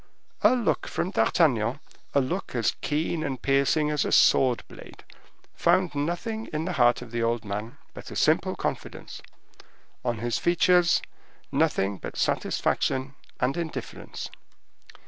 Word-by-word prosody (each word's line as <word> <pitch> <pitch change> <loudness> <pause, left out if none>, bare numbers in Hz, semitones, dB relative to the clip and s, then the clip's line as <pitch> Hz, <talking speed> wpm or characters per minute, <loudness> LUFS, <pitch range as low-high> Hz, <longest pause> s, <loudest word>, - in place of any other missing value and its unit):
A - - +5
look 240 -4 0
from 180 - -2
D'Artagnan, 130 - +2 0.4
a 140 - +5
look 175 +3 -3
as 115 -3 +1
keen 155 +2 -1
and 135 -4 -3
piercing 140 +3 +2
as 150 - +1
a - - -2
sword 125 -3 +4
blade, - - -13 0.5
found 185 -2 +2
nothing 175 +10 -3
in 155 +1 -2
the 185 - -2
heart 120 -4 +3
of 120 - -12
the 120 0 -2
old 115 -1 0
man 105 +6 -5 0.2
but - - -10
a - - -8
simple - - +2
confidence—on 120 -2 -7
his 120 +2 -1
features, 175 0 +3 0.5
nothing 95 0 +1
but - - -7
satisfaction 130 +1 0 0.3
and 130 +2 +1
indifference. 165 -2 -6
140 Hz, 135 wpm, -26 LUFS, 120-170 Hz, 0.5 s, A